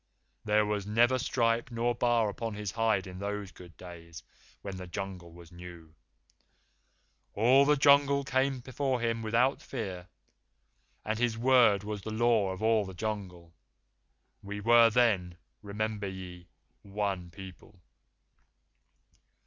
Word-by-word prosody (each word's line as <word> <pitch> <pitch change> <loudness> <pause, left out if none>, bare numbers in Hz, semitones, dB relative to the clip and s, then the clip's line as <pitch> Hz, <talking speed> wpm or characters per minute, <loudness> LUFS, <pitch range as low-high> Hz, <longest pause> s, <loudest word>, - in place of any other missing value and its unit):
There 105 0 +2
was 105 -1 -3
never 120 +4 +3
stripe 120 -1 0
nor 120 0 -1
bar 120 -2 +1
upon 110 +1 -5
his 105 -2 -4
hide 110 -3 0
in 90 -1 -9
those 100 -1 -5
good 85 -2 -15
days 85 -2 -11 0.4
when 100 - -5
this 95 - -8
the 90 - -8
Jungle 90 -1 -7
was 85 0 -15
new. 85 -2 -12 1.4
All 130 +6 +5
the 150 +1 +4
Jungle 140 0 +4
People 130 -1 0
came 135 -1 0
before 130 0 -2
him 115 -1 -1
without 120 +5 +1
fear, 95 -8 -6 1.0
and 110 +1 -2
his 120 -2 0
word 120 -5 +4
was 105 -1 -5
the 110 - -7
Law 110 -2 +2
of 95 +3 -6
all 110 -1 +3
the 95 -2 -9
Jungle. 90 -5 -6 0.9
We 100 +1 -7
were 115 +2 +5
then, 100 -7 +1 0.2
remember 105 0 -4
ye, 90 -2 -9 0.3
one 100 -3 -4
people. 95 +2 -13
105 Hz, 140 wpm, -29 LUFS, 95-120 Hz, 1.4 s, All